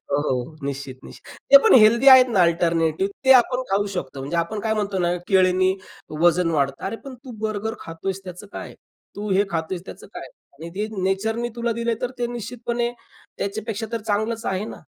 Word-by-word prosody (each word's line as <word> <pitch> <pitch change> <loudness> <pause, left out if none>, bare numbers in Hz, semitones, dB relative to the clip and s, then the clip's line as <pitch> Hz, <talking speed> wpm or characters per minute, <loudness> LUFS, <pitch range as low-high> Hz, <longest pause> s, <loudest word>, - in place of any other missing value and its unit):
हो, 145 +1 +1
हो, 130 +1 -3
निश्चित, 135 -2 -6
निश्चित. - - -13
ते 280 - +11
पण - - +6
हेल्दी 230 +4 +5
आहेत 260 -1 +9
ना 200 -6 +3
अल्टरनेटिव्ह 170 +1 +1
ते 265 - +8
आपण 250 0 +4
खाऊ 200 +1 +1
शकतो. 140 -6 -5
म्हणजे 140 +6 -4
आपण 170 +6 -1
काय 220 +1 -1
म्हणतो 205 -2 -2
ना, 175 -1 +1
केळ्यांनी 185 0 +3 0.5
वजन 175 0 +3
वाढतं. 140 -3 -1
अरे 225 - -4
पण 270 - -8
तू 255 +1 -13 0.2
बर्गर 215 +1 -3
खातोयस 185 +4 -5
त्याचं 180 +2 -9
काय? - - -8 0.4
तू 205 0 -4
हे 195 +2 +3
खातोयस 170 +2 -3
त्याचं - - -10
काय? - - -7 0.3
आणि 165 +2 -8
ते 210 +2 -2 0.2
नेचरनी 220 +5 -1
तुला 235 0 -1
दिलंय 235 0 -1
तर 250 - -1
ते 240 - 0
निश्चितपणे 240 0 -3 0.5
त्याच्यापेक्षा 220 +2 -4
तर 230 - -2
चांगलच 220 +2 -1
आहे 190 +2 -1
ना? - - -9
200 Hz, 190 wpm, -22 LUFS, 170-230 Hz, 0.5 s, ते